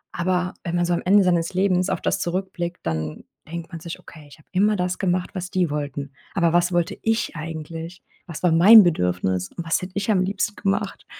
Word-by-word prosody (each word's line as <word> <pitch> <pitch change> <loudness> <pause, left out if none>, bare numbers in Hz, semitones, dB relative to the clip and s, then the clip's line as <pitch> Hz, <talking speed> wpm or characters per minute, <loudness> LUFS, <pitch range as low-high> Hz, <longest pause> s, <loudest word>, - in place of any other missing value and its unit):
aber 180 +1 0
wenn 170 -1 -3
man 175 0 +2
so 175 - 0
am 170 - 0
Ende 200 +2 +5
seines 175 -1 +1
Lebens 185 -1 +2
auf - - -1
das - - 0
zurückblickt, 180 -1 -3
dann 80 -1 -3 0.3
denkt 170 -1 -6
man 165 - -7
sich: 170 +1 -7
„Okay, 155 -3 -14
ich - - -15
habe 155 - -24
immer 205 +3 +3
das 180 0 -2
gemacht, 180 -1 0
was 185 -2 -5
die 185 -4 +1
wollten, 145 -1 -4 0.2
aber 170 -4 +2
was 175 +1 +3
wollte 175 -1 0
ich 225 -4 0
eigentlich? 165 +2 -7 0.2
Was 170 -1 -8
war 180 - +4
mein 200 +7 +9
Bedürfnis? 90 - 0
Und 170 - -4
was 165 - +1
hätte 180 0 -7
ich 200 +2 0
am 190 -3 +3
liebsten 200 +1 -2
gemacht?“ 195 -1 -2
175 Hz, 215 wpm, -23 LUFS, 165-185 Hz, 0.3 s, mein